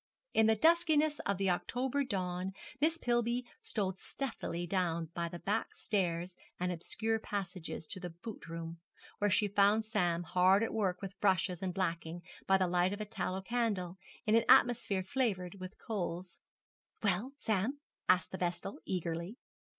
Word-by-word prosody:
In 220 0 +5
the 220 - +5
duskiness 310 +2 +4
of 200 -1 +1
the 195 -1 +2
October 260 +9 0
dawn 185 -5 -2 0.3
Miss 320 +3 +2
Pillby 240 -2 +1 0.2
stole 195 -4 -1
stealthily 190 -4 -4
down 170 -3 0
by 170 0 -1
back 195 +6 -2
stairs 175 -3 -1 0.2
and 180 0 0
obscure 220 +6 -1
passages 185 -6 -4
to 185 - -4
the 180 -1 -5
boot 175 +6 -9
room, 165 0 -6 0.4
where 205 - +3
she 205 +2 +3
found 205 +2 +4
Sam 175 -5 +1
hard 185 +4 +4
at 225 - -1
work 195 -4 0
with 195 0 -6
brushes 185 -3 +2
and 190 -1 -1
blacking, 170 -2 -2 0.2
by 195 - +6
the 190 - +2
light 180 +1 +2
of 205 - -5
a 215 - -2
tallow 190 -2 -3
candle, 200 -6 -1 0.3
in 215 - +2
an 230 0 +5
atmosphere 220 -5 +5
flavoured 195 -6 -1
with 185 +2 -8
coals. 180 -4 -4 0.6
'Well, 205 +7 +1
Sam?' 220 +1 0 0.3
asked 185 0 +4
the 190 - -5
vestal, 175 +2 -2
eagerly. 170 +3 -3
190 Hz, 160 wpm, -34 LUFS, 180-220 Hz, 0.6 s, by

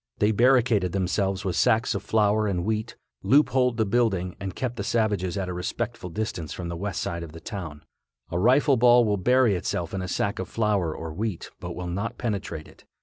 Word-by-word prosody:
They 105 +1 +3
barricaded 115 -5 +3
themselves 95 +1 0
with 90 -3 -1
sacks 115 +6 +3
of 100 - -3
flour 110 0 +2
and 90 -3 -1
wheat, 110 +1 -2 0.3
loopholed 125 -3 +3
the 110 - +2
building 100 -5 0
and 95 -2 -5
kept 125 -2 -3
the - - -2
savages 100 -6 0
at 95 -2 -2
a 90 - -3
respectful 95 +2 -4
distance 90 -4 -4
from 90 -2 -5
the 85 - -4
west 100 +4 -3
side 85 0 -3
of 80 -2 -8
the 80 - -9
town. 80 -7 -7 0.5
A 85 - -1
rifle 130 +6 +4
ball 120 0 +6
will 105 -1 +1
bury 125 +2 +3
itself 85 -1 -2
in 95 - -2
a 90 - -4
sack 100 +2 -1
of 95 - -4
flour 105 -7 0
or 80 -1 -6
wheat, 100 0 -4
but - - -6
will 90 - -5
not 100 +7 -3
penetrate 100 -9 -4
it. - - -18
100 Hz, 205 wpm, -26 LUFS, 90-115 Hz, 0.5 s, ball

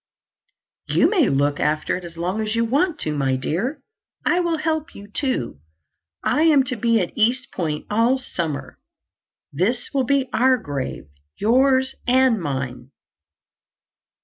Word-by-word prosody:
"You - - +4
may 355 - +3
look 145 +1 +1
after 155 +1 0
it 180 - -6
as 170 -1 -10
long 180 +6 -2
as 215 +1 -2
you 230 0 +2
want 300 +8 +1
to, 155 -1 -2
my 135 -2 +1
dear. 225 - -2 0.4
I 350 - +3
will 340 -2 0
help 315 +1 -2
you, 200 - -10
too. 205 - -2 0.6
I 300 - +2
am 310 -4 +5
to 255 -1 -4
be 230 0 +2
at 180 - -3
East 245 +3 +1
Point 155 -4 -3
all 230 +5 +2
summer. 170 - -5 0.7
This 230 - -1
will 270 -2 +1
be 275 +1 +1
our 260 +1 +4
grave—yours 210 - 0
and 255 -4 +4
mine." 130 -4 -4
225 Hz, 145 wpm, -22 LUFS, -, 0.7 s, am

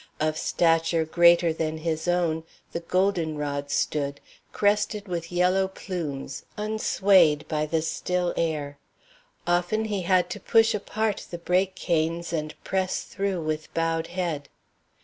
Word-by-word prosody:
Of 155 0 +1
stature 165 0 +2
greater 170 0 +5
than 160 -1 -2
his 160 +1 -2
own 170 -2 +1 0.3
the - - -3
golden 170 -3 0
rod 145 -1 -3
stood, 140 -1 -1 0.3
crested 210 0 +1
with 170 -2 -4
yellow 180 +2 +2
plumes, 165 -8 -5
unswayed 195 -7 +3
by 155 -1 -1
the 160 0 0
still 180 +2 -1
air. 150 -3 -2 0.7
Often 175 +5 +1
he 205 -3 -2
had 180 0 +3
to - - -4
push 225 0 +4
apart 215 0 -2
the 175 - -5
brake 185 +2 +1
canes 170 -1 -1
and 155 -1 -3
press 190 -1 -1
through 195 -4 -2
with 155 0 -3
bowed 165 0 0
head. 170 -6 -3
170 Hz, 135 wpm, -26 LUFS, 155-185 Hz, 0.7 s, greater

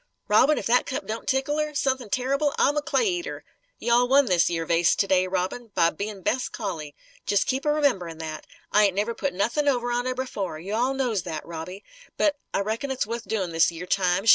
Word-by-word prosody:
Robin, 265 +8 +5
if - - -3
that 245 +2 +3
cup 285 +2 -3
don't 220 +1 -5
tickle 270 +3 0
her, 305 -1 -2
suthin' 260 -5 0
terrible, 275 +5 0
I'm 290 - +3
a 295 - +1
clay 385 +9 +1
eater! 355 -2 -3 0.3
You 235 - 0
all 245 +1 +4
won 275 +2 +5
this 180 -7 +3
yer 165 -1 -2
vase, 170 +1 +3
to - - +1
day, 185 -1 +3
Robin; 190 +6 -3
by 170 -2 +4
bein' 200 +2 -6
'best 250 +6 0
collie.' 165 -9 -5 0.3
Jes' 200 -1 +3
keep 270 +3 -2
a - - +4
rememberin' 235 - 0
that. 160 -1 -7 0.2
I 210 0 +5
ain't 195 -2 +1
never 210 +4 0
put 280 - -2
nothin' 235 +10 0
over 245 -3 +1
on 245 +1 0
her, 255 - -1
b'fore. 200 -10 -4
You 185 +6 -6
all 250 +4 +1
knows 245 -7 0
that, 160 -3 -6
Robbie. 170 +4 -7 0.3
But 300 -2 +2 0.2
I - - 0
reckon 220 +7 -2
it's 265 -4 -1
wuth 230 +1 -5
doin', 190 -6 -1
this 165 +1 +3
yer 170 +1 -7
time. 185 +1 +1
220 Hz, 225 wpm, -25 LUFS, 180-265 Hz, 0.3 s, Robin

